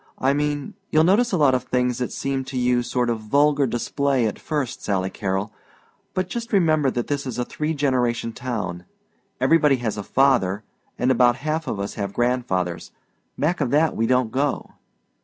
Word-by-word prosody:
I 135 +1 +2
mean 145 -1 -2 0.2
you'll 155 0 +4
notice 210 +8 +3
a 185 - +1
lot 145 -4 +4
of 130 -1 0
things 125 -1 0
that'll 125 - -1
seem 135 -1 -2
to 135 0 -5
you 125 0 +2
sort 120 0 0
of 115 - -2
vulgar 140 +5 +2
display 135 +2 0
at 105 - -2
first, 145 -6 -3
Sally 95 -2 -1
Carrol; 95 +1 -2 0.6
but 185 -1 0
just 235 +4 -5
remember 155 - +3
that 120 -2 -2
this 140 -2 -3
is 125 - -4
a 125 - -1
three 155 +4 -3
generation 125 -5 0
town. 105 -9 -4 0.5
Everybody 145 +2 +4
has 120 -4 -3
a - - -4
father, 115 -6 +2 0.3
and 125 +1 +2
about 120 -1 +4
half 155 0 -1
of 105 - -3
us 100 +1 -3
have 100 0 -3
grandfathers. 95 -9 -1 0.5
Back 160 +3 0
of 135 - +1
that 155 +4 +2
we 115 - +1
don't 125 -2 +2
go." 140 +2 -1
130 Hz, 185 wpm, -23 LUFS, 115-145 Hz, 0.6 s, you'll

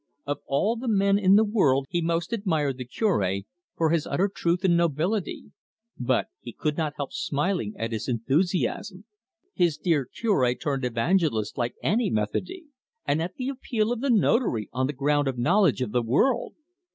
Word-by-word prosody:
Of 145 0 -2
all 200 +12 +1
men 200 -4 +2
in 195 -1 +5
the 215 - +6
world 150 - +2
he 175 - 0
most 170 +4 -1
admired 160 - -1
the 125 - -5
Cure, 105 - 0 0.4
for 160 -1 +2
his 165 -3 +1
utter 180 +8 +1
truth 175 +2 0
and 180 -3 +4
nobility; 170 +5 -1 0.4
but 125 0 0
he 120 - -9
could 150 -1 -2
not 155 -2 -2
help 140 -2 -5
smiling 145 - -1
at 115 +1 -3
his 110 -2 -3
enthusiasm 175 - -1 0.5
his 170 -4 +1
dear 155 -5 +1
Cure 130 - +1
turned 135 -2 -2
evangelist 125 - 0
like 120 -2 -2
any 225 +1 +1
"Methody"! 110 - -2 0.4
and 145 +3 +1
at 180 +2 -4
the 255 0 -3
appeal 235 -4 -1
of 240 -1 -2
the 275 - 0
Notary 215 - +2
on 130 +1 0
the 145 - -3
ground 145 +1 +1
of 130 -2 -2
knowledge 165 +3 +3
of 105 - -5
the 125 - +1
world. 225 - +1
160 Hz, 175 wpm, -26 LUFS, 130-200 Hz, 0.5 s, the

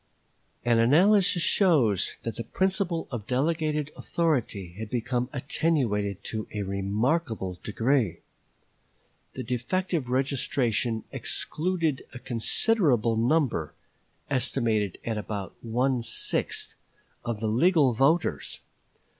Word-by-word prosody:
An 120 -1 +4
analysis 175 - +5
shows 130 - +3
that 115 -2 -4
the 115 - -4
principle 190 - 0
of 115 -5 -5
delegated 150 +2 0
authority 120 - -1
had 110 -1 -5
become 125 +1 -1
attenuated 125 - 0
to 110 -1 -4
a 105 - -1
remarkable 100 - -1
degree. 115 - 0 1.1
The 130 - -4
defective 130 +5 -1
registration 125 -4 0
excluded 165 -4 -1
a - - -4
considerable 125 - +1
number 115 - +1 0.5
(estimated 115 -7 0
at 110 -2 -1
about 100 -2 -5
one 125 +2 +1
sixth) 115 - -1 0.5
of 120 -3 -3
the 110 - -3
legal 135 - +4
voters. 140 +8 +1
125 Hz, 100 wpm, -27 LUFS, 110-155 Hz, 1.1 s, analysis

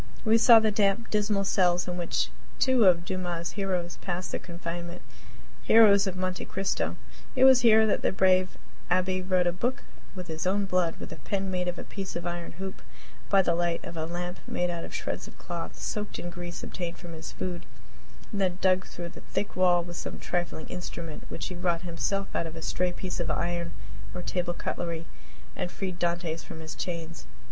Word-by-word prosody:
We 225 +1 +6
saw 230 0 +9
the 220 -1 +2
damp, 200 +2 +2
dismal 210 -1 +2
cells 180 -2 +3
in 180 - -2
which 175 -1 0 0.3
two 260 -4 +4
of 175 -2 +5
Dumas' 175 -2 -2
heroes 185 -4 -2
passed 180 0 -3
their - - -1
confinement 170 0 -6 0.6
heroes 205 -3 +7
of 190 - -2
"Monte 185 0 -2
Cristo." 195 0 -1 0.4
It 260 - +4
was 265 -1 +8
here 220 -2 +7
that 215 - +2
the - - +2
brave 185 -1 +3 0.3
Abbe 185 +1 +2
wrote 185 -1 +2
a 175 - +3
book 240 +9 -1 0.3
with 180 -1 -5
his 160 +1 -3
own 200 +2 +2
blood, 180 -3 +1
with - - -7
a - - -9
pen 195 -1 -2
made 180 -1 -1
of 180 - -2
a - - -5
piece 195 -1 -6
of 175 0 -4
iron 175 -1 -4
hoop, 190 +2 -5
and - - -21
by 195 -1 +6
the 170 - +2
light 170 0 0
of 170 - -7
a 160 -1 -2
lamp 175 +1 -4
made 175 0 0
out 170 -1 -4
of - - -7
shreds - - -3
of - - -14
cloth - - -6
soaked 210 -1 -3
in 175 - -5
grease 175 0 -6
obtained 175 -1 -4
from 175 -2 -9
his 160 0 -7
food; 175 -2 -4 0.6
and 205 -3 -1
then 180 -2 +1
dug 185 0 +3
through 170 -1 -6
the - - -12
thick 205 - -3
wall 180 -1 +4
with 175 0 -7
some - - -5
trifling 175 -2 -2
instrument 170 -3 -6
which - - -4
he 180 - -5
wrought 175 -1 0
himself 195 +3 -2
out 165 - 0
of 160 - -8
a 165 - -6
stray 180 +2 +1
piece 185 +1 -4
of 175 - -1
iron 170 0 -1 0.4
or 180 - -4
table 175 -1 -1
cutlery 170 -2 -3 0.5
and 180 - -2
freed 185 -3 -4
Dantes 170 -2 -1
from 160 - -9
his 160 0 -6
chains. 165 -2 -5
180 Hz, 205 wpm, -28 LUFS, 175-195 Hz, 0.6 s, saw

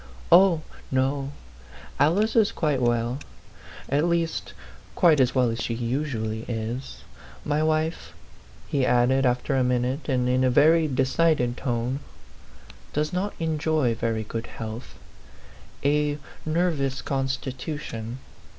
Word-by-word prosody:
"Oh, 180 -3 +6 0.3
no, 135 +1 0 0.7
Alice 185 +10 +3
is 220 -3 +4
quite 150 -5 0
well; 120 +1 +1 0.7
at 145 +4 +1
least, 170 -1 -1 0.4
quite 165 -5 +5
as 130 0 +3
well 125 -3 +3
as 115 - -4
she 115 - -2
usually 115 -3 -2
is. 120 +3 -4 0.4
My 150 +1 +1
wife," 155 +1 0 0.6
he 140 -2 0
added, 130 +2 +3
after 125 +3 0
a 130 - +3
minute, 125 +4 -1
and 125 -2 +1
in 130 +1 +2
a 130 - +4
very 155 +5 +5
de 135 -2 +1
cided 130 -4 +2
tone, 125 +1 -2 0.5
" - - -22
does 150 +3 -1
not 195 +3 -2
enjoy 155 -5 +1
very 115 -1 -1
good 115 +2 -5
health 110 +2 -7 0.9
a 145 0 +2 0.3
nervous 155 -6 0
constitution. 135 -3 -4
135 Hz, 125 wpm, -25 LUFS, 120-155 Hz, 0.9 s, Oh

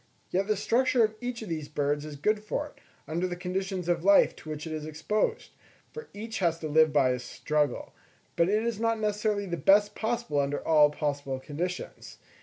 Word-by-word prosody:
Yet 195 +2 0
the 215 -1 +1
structure 245 +3 +2
of 215 0 +1
each 245 -2 -4
of 210 - -8
these 155 -3 -4
birds 145 0 -1
is 150 -1 -7
good 210 +9 0
for 290 +7 -2
it, 295 - -13 0.3
under 170 +4 -1
the 175 - -4
conditions 185 0 -3
of 170 -1 +1
life 200 +1 +5
to 155 - -11
which 155 0 -5
it 160 - -5
is 155 -1 -4
exposed, 155 +8 -2 0.4
for 465 - -9
each 220 +2 -6
has 170 -3 +1
to 155 - -3
live 155 +1 +4
by 140 -3 +4
a 125 - -1
struggle: 145 +3 -2 0.4
but 170 +2 +3
it 215 +2 +2
is 230 -2 -2
not 230 0 +1
necessarily 210 -1 0
the 175 -2 -3
best 205 +4 +4
possible 225 -10 -1
under 140 +1 -2
all 150 -2 +6
possible 145 -3 -3
conditions. 170 +7 -5
180 Hz, 205 wpm, -28 LUFS, 150-215 Hz, 0.4 s, all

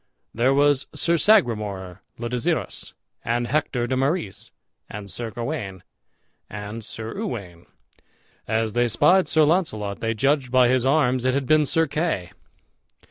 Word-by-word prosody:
There 120 +4 +2
was 145 0 +3
Sir 170 - +2
Sagramour 105 - +2 0.2
le 120 - -4
Desirus, 120 0 -2 0.3
and 120 +1 0
Hector 125 -3 -1
de 130 - -1
Marys, 135 - -2 0.4
and 105 -1 -7
Sir 115 +6 -4
Gawain, 110 - -5 0.7
and 105 +2 -7
Sir 110 +1 -6
Uwaine. 90 -8 -6 0.8
As 110 -1 0
they 120 +1 +2
spied 150 - +3
Sir 155 - +4
Launcelot 130 - 0
they 115 0 -1
judged 135 +2 +1
by 125 -1 +4
his 130 0 +2
arms 130 -4 +2
it 130 0 +1
had 140 -1 -1
been 155 +1 +3
Sir 165 +3 +2
Kay. 150 - -2
120 Hz, 140 wpm, -23 LUFS, 110-145 Hz, 0.8 s, Sir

